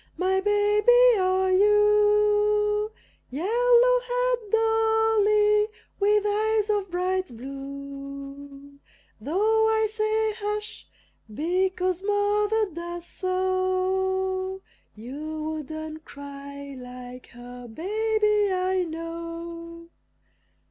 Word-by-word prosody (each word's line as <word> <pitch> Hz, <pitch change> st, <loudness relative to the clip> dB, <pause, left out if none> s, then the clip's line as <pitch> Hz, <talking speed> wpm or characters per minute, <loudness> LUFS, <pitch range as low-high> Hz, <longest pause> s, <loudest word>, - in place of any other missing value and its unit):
My 380 Hz, +1 st, +1 dB
baby 420 Hz, +4 st, +4 dB
are 375 Hz, 0 st, +2 dB
you, 420 Hz, +1 st, +3 dB, 0.4 s
Yellow 485 Hz, -, +3 dB
haired -, -, -1 dB
Dolly, 445 Hz, -2 st, +3 dB, 0.3 s
with 415 Hz, +1 st, +3 dB
eyes 430 Hz, 0 st, +1 dB
of 405 Hz, -2 st, -1 dB
bright 370 Hz, +1 st, -1 dB
blue; 275 Hz, +1 st, -9 dB, 0.4 s
Though 430 Hz, -, +2 dB
I 440 Hz, 0 st, +2 dB
say 435 Hz, 0 st, 0 dB
"Hush!" 420 Hz, 0 st, -4 dB, 0.4 s
because 365 Hz, -, -1 dB
Mother 415 Hz, +1 st, +1 dB
does 345 Hz, +1 st, -6 dB
so, 375 Hz, +1 st, -1 dB, 0.3 s
You 300 Hz, +8 st, -6 dB
wouldn't 315 Hz, 0 st, -6 dB
cry 280 Hz, -1 st, -9 dB
like 250 Hz, 0 st, -10 dB
her 245 Hz, 0 st, -11 dB
baby, 420 Hz, -, 0 dB
I 370 Hz, 0 st, 0 dB
know! 335 Hz, +1 st, -7 dB
380 Hz, 80 wpm, -25 LUFS, 315-420 Hz, 0.4 s, baby